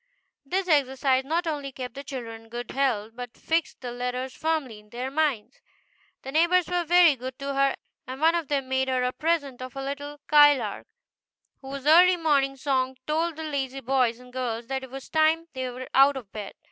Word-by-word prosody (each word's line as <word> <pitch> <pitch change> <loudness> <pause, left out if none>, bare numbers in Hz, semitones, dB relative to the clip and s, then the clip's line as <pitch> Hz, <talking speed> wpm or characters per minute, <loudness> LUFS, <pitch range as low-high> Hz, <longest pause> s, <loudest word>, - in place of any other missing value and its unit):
This 370 +6 -2
exercise 265 -3 +2
not 330 +4 0
only 290 -4 -3
kept 250 -1 -7
the 275 - -8
children 240 -5 -7
in - - -21
good 240 +1 -6
health, 240 -6 0
but 245 0 -8
fixed 325 0 -1
the 245 -2 -5
letters 250 +1 -4
firmly 310 -9 -2
in 210 0 -21
their 250 +4 -5
minds. 300 - -1 0.6
The 270 - -6
neighbors 345 +4 +3
were 355 -1 0
very 345 -2 +6
good 255 0 -7
to 275 0 -4
her, 275 0 +2 0.3
and 260 +1 -6
one 325 +2 +4
of 335 -3 -1
them 275 -2 -1
made 265 0 0
her 255 -1 0
a 250 - +1
present 285 -5 -1
of 255 0 -8
a 270 - -4
little 285 +1 -5
skylark, 290 -8 +4 0.7
whose 270 0 -7
early 355 +4 +7
morning 280 -4 +2
song 260 -2 -1
told 325 +2 0
the 320 - -6
lazy 275 -3 -3
boys 250 -2 +1
and 250 0 -16
girls 240 -3 -3
that 265 0 -2
it 265 - -9
was 270 +1 -8
time 320 +1 +2
they 260 -1 -3
were 255 +1 -7
out 275 +1 +5
of 220 -7 -9
bed. 210 -2 -7
270 Hz, 200 wpm, -26 LUFS, 255-310 Hz, 0.7 s, early